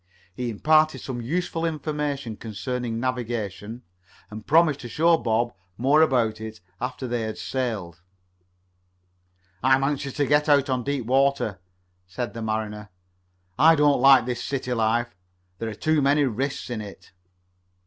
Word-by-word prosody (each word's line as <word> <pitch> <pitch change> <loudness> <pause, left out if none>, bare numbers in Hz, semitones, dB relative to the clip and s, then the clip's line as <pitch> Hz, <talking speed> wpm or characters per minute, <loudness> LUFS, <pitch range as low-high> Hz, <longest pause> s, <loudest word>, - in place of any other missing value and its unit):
He 125 +4 -3
imparted 155 +8 +3
some 125 -3 -5
useful 165 +5 -2
information 150 -6 -3
concerning 115 +2 -4
navigation, 115 -3 -4 0.5
and 105 0 -9
promised 155 -2 +4
to 120 - -8
show 165 +7 +4
Bob 120 -2 0 0.2
more 140 +6 +4
about 115 -8 +2
it 110 0 -7 0.2
after 130 +1 -4
they 120 -1 -2
had 110 -1 -4
sailed. 105 -11 -4 1.6
"I'm 130 +1 +4
anxious 140 -1 -1
to 145 - 0
get 150 +2 +2
out 140 -1 +4
on 130 -1 0
deep 140 -3 -2
water," 135 -6 +1 0.5
said 120 +7 -5
the 115 - -6
mariner. 110 -1 -3 0.7
"I 160 +1 +7
don't 145 -2 +3
like 135 -3 +7
this 120 -1 -3
city 130 -2 -2
life. 115 -1 0 0.4
There 115 - -3
are 105 - -7
too 155 +6 +1
many 145 +2 +3
risks 130 +1 -3
in 115 -3 -3
it." 100 -2 -11
125 Hz, 145 wpm, -24 LUFS, 110-140 Hz, 1.6 s, I